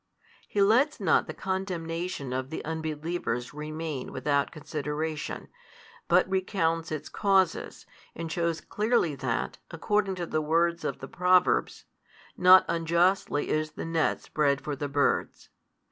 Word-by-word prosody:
He 200 Hz, -, +2 dB
lets 250 Hz, +9 st, +3 dB
not -, -, +3 dB
the -, -, -5 dB
condemnation 175 Hz, -6 st, -3 dB
of 130 Hz, 0 st, -3 dB
the 160 Hz, -, -5 dB
unbelievers 160 Hz, -5 st, -3 dB
remain 150 Hz, -2 st, -5 dB
without 140 Hz, +2 st, 0 dB
consideration, 150 Hz, 0 st, -4 dB, 0.6 s
but 180 Hz, +1 st, +4 dB
recounts 175 Hz, -4 st, 0 dB
its 155 Hz, -1 st, -4 dB
causes, 195 Hz, -4 st, +1 dB, 0.3 s
and 165 Hz, 0 st, -5 dB
shews 170 Hz, -1 st, -1 dB
clearly 210 Hz, -7 st, +1 dB
that, 130 Hz, -3 st, -3 dB
according 195 Hz, +3 st, 0 dB
to 175 Hz, -1 st, -3 dB
the 155 Hz, -1 st, -1 dB
words 170 Hz, +2 st, +1 dB
of -, -, -3 dB
the -, -, -6 dB
Proverbs, 180 Hz, 0 st, +2 dB, 0.5 s
Not 185 Hz, +1 st, +7 dB
unjustly 170 Hz, -1 st, +1 dB
is 155 Hz, 0 st, -1 dB
the -, -, -6 dB
net 165 Hz, -1 st, 0 dB
spread 140 Hz, -2 st, +1 dB
for 150 Hz, -, -3 dB
the 145 Hz, +1 st, -4 dB
birds. 140 Hz, 0 st, 0 dB
165 Hz, 130 wpm, -28 LUFS, 150-180 Hz, 0.6 s, Not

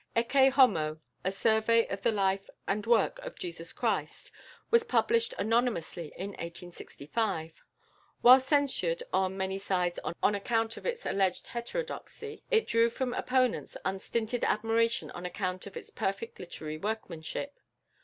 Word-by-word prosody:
"Ecce 265 Hz, +4 st, +5 dB
Homo; 160 Hz, -, +4 dB, 0.2 s
a 190 Hz, -, 0 dB
Survey 220 Hz, +3 st, +3 dB
of 195 Hz, -, -4 dB
the 230 Hz, -, +3 dB
Life 195 Hz, -2 st, 0 dB, 0.2 s
and 205 Hz, +2 st, -1 dB
Work 235 Hz, -, +3 dB
of -, -, -8 dB
Jesus 360 Hz, -4 st, -6 dB
Christ," -, -, -2 dB, 0.4 s
was 465 Hz, 0 st, +6 dB
published 460 Hz, +1 st, +2 dB
anonymously 220 Hz, -8 st, 0 dB
in 195 Hz, +2 st, -4 dB
1865. 170 Hz, 0 st, -4 dB, 0.6 s
While 255 Hz, +2 st, +10 dB
censured 285 Hz, -, +1 dB
on 190 Hz, 0 st, +1 dB
many 190 Hz, 0 st, -2 dB
sides 180 Hz, -3 st, 0 dB, 0.2 s
on -, -, +5 dB
account 225 Hz, +2 st, 0 dB
of -, -, -6 dB
its 485 Hz, 0 st, -3 dB
alleged 190 Hz, -2 st, +1 dB
heterodoxy, 440 Hz, -, -5 dB
it 450 Hz, -2 st, +3 dB
drew 230 Hz, 0 st, +3 dB
from 245 Hz, +1 st, -2 dB
opponents 255 Hz, -1 st, 0 dB
unstinted 220 Hz, +5 st, -2 dB
admiration 225 Hz, +2 st, +1 dB
on 175 Hz, -, -8 dB
account 185 Hz, +1 st, -3 dB
of 195 Hz, -, -8 dB
its -, -, -9 dB
perfect 195 Hz, +4 st, -3 dB
literary 155 Hz, -3 st, -6 dB
workmanship. 215 Hz, -, -4 dB
225 Hz, 135 wpm, -30 LUFS, 190-255 Hz, 0.6 s, While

